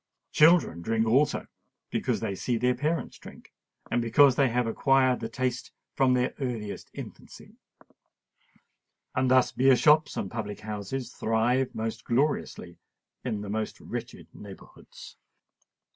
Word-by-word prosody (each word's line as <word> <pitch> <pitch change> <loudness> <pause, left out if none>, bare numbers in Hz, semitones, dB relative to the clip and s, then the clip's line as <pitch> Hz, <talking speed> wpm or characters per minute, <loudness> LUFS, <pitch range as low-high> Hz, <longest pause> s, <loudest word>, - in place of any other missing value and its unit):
Children 155 - +4
drink 110 +4 0
also, 130 +7 +2 0.5
because - - -1
they - - -2
see 120 +5 -2
their 125 +2 +2
parents 150 +6 -3
drink, - - -14 0.4
and 120 - +1
because 125 +3 +5
they 135 -1 +3
have 125 +1 0
acquired 130 +2 +2
the 115 - -5
taste 125 +1 -3 0.2
from 130 -1 +3
their 125 0 0
earliest 115 -6 -5
infancy;—and - - -11 1.7
thus 130 0 +4
beer 130 +1 +4
shops 150 +3 +3
and 95 - -3
public 105 -3 -5
houses 110 +4 -5
thrive 120 +4 0
most 110 0 -4
gloriously 120 - -2 0.4
in 110 -5 -3
the 105 - -7
most 110 0 -3
wretched - - -7
neighbourhoods. 100 -2 -13
125 Hz, 130 wpm, -27 LUFS, 110-135 Hz, 1.7 s, because